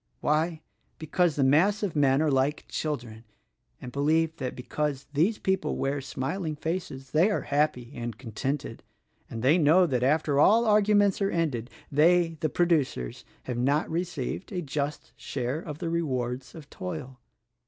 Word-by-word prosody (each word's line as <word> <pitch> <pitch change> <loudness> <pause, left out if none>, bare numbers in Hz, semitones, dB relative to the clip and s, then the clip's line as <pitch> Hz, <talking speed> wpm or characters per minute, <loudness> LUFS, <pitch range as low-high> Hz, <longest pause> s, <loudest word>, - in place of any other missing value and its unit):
Why, 155 +2 0 0.3
because 160 +1 +1
the 140 - +2
mass 180 +11 +3
of 190 -6 -2
men 140 0 +3
are 155 - +2
like 135 +2 +1
children 120 -7 -4 0.6
and 125 - -8
believe 160 +4 +1
that 130 -4 -4
because 145 +2 -3
these 175 +10 +2
people 190 -5 -1
wear 140 +1 -1
smiling 155 +5 -3
faces 150 -5 -4
they 165 +7 +4
are 205 - 0
happy 140 -4 0
and 120 -2 -5
contented; 130 +2 -4 0.5
and 115 0 -6
they 150 +7 +5
know 165 +4 +5
that 130 -7 0
after 145 +1 +2
all 225 +9 +5
arguments 210 -2 +3
are 195 - +2
ended, 140 - -1 0.2
they, 165 +2 +3
the 155 -1 0
producers, 145 - 0 0.2
have 125 -2 -4
not 140 +5 +2
received 170 - -3
a 180 -3 -3
just 145 0 -4
share 130 +3 -3
of 150 -3 -7
the 165 0 -3
rewards 130 -6 -2
of 155 -4 -10
toil. 155 -9 -6
150 Hz, 155 wpm, -27 LUFS, 130-170 Hz, 0.6 s, they